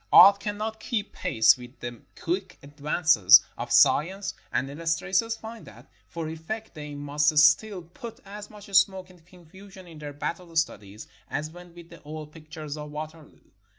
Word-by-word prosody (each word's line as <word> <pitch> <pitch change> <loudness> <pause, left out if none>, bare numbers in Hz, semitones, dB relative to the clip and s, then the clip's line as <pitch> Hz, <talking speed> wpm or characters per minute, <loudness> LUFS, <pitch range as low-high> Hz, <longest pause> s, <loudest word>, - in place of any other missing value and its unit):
Art 200 0 +9
cannot 215 +2 -4
keep 215 -4 -3
pace 110 0 +4
with 125 +1 -13
the 120 -1 -7 0.2
quick 185 +2 -3
advances 145 - +5
of - - -6
science, 190 +6 +3 0.2
and 130 - 0
illustrators 165 +9 -1
find 225 0 -10
that - - -15 0.2
for 165 -2 -5
effect 165 +8 -6
they 150 -2 -8
must 150 +1 0
still 175 +6 +4
put 225 +7 -10
as 205 +1 -9
much 210 -1 -13
smoke 190 -1 +3
and 175 -3 -20
confusion 190 +2 -15
in 165 -3 -13
their 145 -1 -7
battle 165 +4 -5
studies 105 -10 -2 0.2
as 155 +2 -3
went 175 0 -14
with 170 -1 -13
the 170 - -13
old 150 0 -8
pictures 155 -1 -8
of 150 0 -7
Waterloo. 155 +1 -9
165 Hz, 160 wpm, -26 LUFS, 150-195 Hz, 0.2 s, Art